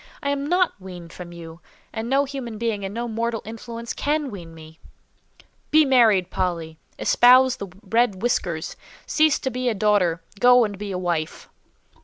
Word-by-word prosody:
I 280 - 0
am 285 0 -2
not 360 +1 +2
weaned 180 -3 -10
from 175 -1 -9
you, 165 0 -11 0.3
and 225 +1 -4
no 275 +2 +3
human 260 -5 -6
being 220 -3 -2
and 195 - -4
no 235 +3 -4
mortal 230 0 -2
influence 230 +1 -7
can 295 -1 -1
wean 170 -5 -10
me." 160 0 -14 0.9
"Be 310 0 +5
married, 220 -9 +4
Polly! 165 -3 -3 0.2
Espouse 255 +1 +5
the 200 - -6 0.2
red 225 -4 +1
whiskers. 170 -9 -1 0.3
Cease 310 -1 +3
to 265 - -3
be 250 0 -1
a 225 - -1
daughter; 195 -5 +1 0.2
go 245 0 +6
and 205 -1 -5
be 205 -1 -5
a 185 - -2
wife!" 170 -3 -3
220 Hz, 170 wpm, -23 LUFS, 180-250 Hz, 0.9 s, go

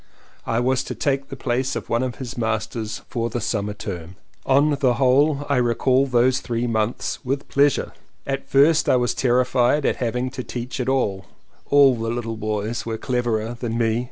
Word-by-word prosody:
I 115 - +1
was 130 +1 +1
to - - -5
take 135 -1 -1
the - - -6
place 130 0 -1
of - - -5
one 115 - 0
of 130 -3 -2
his 125 +1 -7
masters 110 -1 -3
for 115 -1 -2
the 120 - -3
summer 105 -1 -2
term. 90 -4 -7 0.3
On 140 +3 +4
the 130 -4 +3
whole 140 +3 +3
I 140 -2 +1
recall 125 +2 +2
those 125 0 +3
three 120 0 -2
months 110 +2 -2
with 135 +2 -2
pleasure. 140 -1 +2 0.3
At 135 0 -4
first 150 +3 +4
I - - +5
was 125 -1 +1
terrified 125 +2 +2
at - - +1
having 125 +1 -2
to 130 - -5
teach 125 +1 -6
at 125 0 -1
all: 100 -8 0 0.4
all 140 -2 +6
the 115 -1 -3
little 115 -1 -3
boys 110 +2 -2
were 115 -1 -4
cleverer 120 -2 -1
than 115 -2 -3
me. 115 -1 +1
125 Hz, 185 wpm, -22 LUFS, 115-130 Hz, 0.4 s, all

